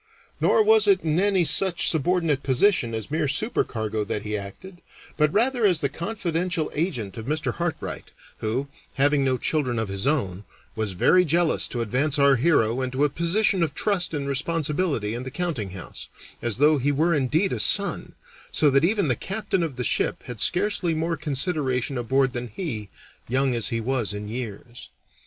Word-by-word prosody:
Nor 440 - +4
was 440 0 +4
it 395 -2 +4
in 160 +1 +1
any 195 -3 +2
such 185 +1 +1
subordinate 160 -2 +1
position 135 - +2
as 110 +4 -6
mere 155 -1 0
supercargo 110 - -1
that 105 0 -3
he 105 0 -3
acted, 175 - -8 0.3
but 150 -1 +2
rather 240 +4 +1
as 185 -6 +4
the 140 -3 0
confidential 170 -1 -2
agent 125 - -3
of 110 - -8
Mr. 155 +2 -1
Hartright, 170 -2 -4 0.3
who, 120 +6 -2 0.3
having 145 +1 +3
no 130 -1 +1
children 130 -4 -1
of 110 -3 -2
his 100 +6 -3
own, 105 -11 -1 0.3
was 110 -3 -2
very 180 - +4
jealous 170 0 +2
to 120 - -4
advance 135 +7 0
our 140 -1 +5
hero 125 -4 +2
into 130 +2 -1
a 150 - +3
position 180 +5 +1
of 155 -4 0
trust 200 -4 0
and 140 -1 -3
responsibility 150 - -1
in 120 - -4
the 130 - -6
countinghouse, 125 - -5 0.3
as 120 -3 0
though 150 +2 +4
he 140 +3 +1
were 160 +5 +2
indeed 150 +7 +1
a - - -3
son, 200 -1 +2 0.4
so 150 -2 +3
that 140 +2 +3
even 200 0 +2
the 125 - +2
captain 195 - -2
of 160 -6 -3
the 125 - -3
ship - - -1
had 120 -3 -8
scarcely 185 - +1
more 165 +1 -1
consideration 140 -4 -1
aboard 130 +2 +1
than 120 0 -4
he, 110 - -5 0.4
young 130 +1 +1
as 115 -4 0
he 115 - -1
was 115 -4 -1
in 105 0 -6
years. 120 0 -7
145 Hz, 180 wpm, -24 LUFS, 120-170 Hz, 0.4 s, our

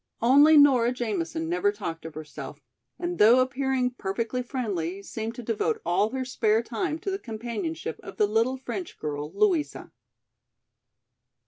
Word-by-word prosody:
Only 290 +6 +7
Nora 260 -5 +6
Jamison 190 -10 -2
never 180 +4 +1
talked 180 -6 -6
of 160 - -11
herself, 155 -1 -8 0.4
and 350 0 -4
though 230 +4 +7
appearing 260 0 +1
perfectly 230 +2 -3
friendly, 200 - -3
seemed 225 +2 -5
to 245 - -7
devote 235 - -1
all 205 +5 +2
her 260 +2 -3
spare 225 -3 +1
time 230 +6 -2
to 390 - -2
the 385 - -2
companionship 215 - -5
of 195 - -10
the 210 - +4
little 225 +5 +1
French 335 +7 -6
girl, 150 0 -4
Louisa. 360 -8 0
230 Hz, 145 wpm, -26 LUFS, 195-260 Hz, 0.4 s, Only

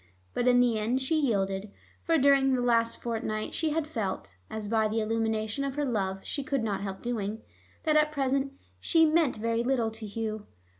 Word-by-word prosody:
But 245 - 0
in 245 0 +6
the 235 -3 +2
end 235 +5 0
she 265 +5 0
yielded, 200 -8 0 0.3
for 330 -1 +2
during 275 -1 +4
this 245 - 0
last 230 -1 +2
fortnight 220 -2 -3
she 320 - 0
had 310 0 0
felt 215 - -4 0.2
(as 215 -1 -5
by 220 0 +2
the 220 +1 -1
illumination 220 +2 -1
of 275 -1 -3
her 295 0 0
love 195 -6 -1
she 285 - -3
could 275 -3 -1
not 205 -3 -1
help 195 -1 -5
doing) 220 -2 -3 0.4
that 310 -2 +2
at 305 0 +4
present 275 -1 0 0.3
she 325 -2 +4
'meant' 315 -3 +3
very 230 +1 0
little 240 -3 +1
to 220 0 -7
Hugh. 215 0 -4
230 Hz, 195 wpm, -29 LUFS, 215-275 Hz, 0.4 s, in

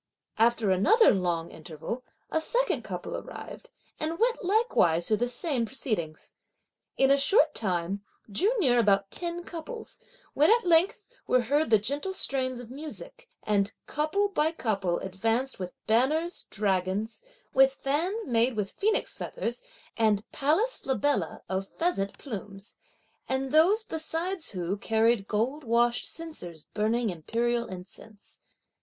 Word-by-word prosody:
After 225 -3 +3
another 410 - +5
long 175 -3 -1
interval, 165 - -7 0.3
a 320 - +1
second - - +1
couple - - -5
arrived, - - -8 0.3
and 320 +2 -2
went 470 +2 +1
likewise 360 - +2
through 215 - +2
the 245 - 0
same 250 +1 -1
proceedings. 205 - -4 0.6
In 270 0 +4
a 280 - +6
short 300 +1 +4
time, 190 -1 -2 0.2
drew 310 - +2
near 255 - +4
about 200 -3 +3
ten 345 0 -3
couples, 365 +8 -6 0.3
when, 300 - +4
at 460 -1 +4
length, 350 +4 +4 0.2
were 255 - +4
heard 290 +6 +1
the 220 - +7
gentle 285 - -1
strains 255 -6 0
of 245 -1 -10
music, 465 - -7
and 205 0 +1
couple 310 +7 0
by 315 -5 +1
couple 200 - -1
advanced 225 +8 -1
with 180 -1 -4
banners, 300 +10 +1
dragons, 200 +1 -1 0.3
with 270 0 +6
fans 345 +13 -1
made 235 -1 +2
with 205 -2 -2
phoenix 430 +2 0
feathers, - - -4 0.3
and 215 -2 +1
palace 325 - +1
flabella 265 - -1
of 190 +1 -2
pheasant 265 - -1
plumes; 205 -5 -8 0.5
and 265 0 -1
those 360 +9 +5
besides 330 0 -3
who 185 0 -3
carried 225 -1 +2
gold 250 +8 -1
washed 240 0 +2
censers 180 - -6
burning 220 +1 +1
imperial 235 +8 -1
incense. 190 +3 -12
245 Hz, 135 wpm, -28 LUFS, 200-320 Hz, 0.6 s, the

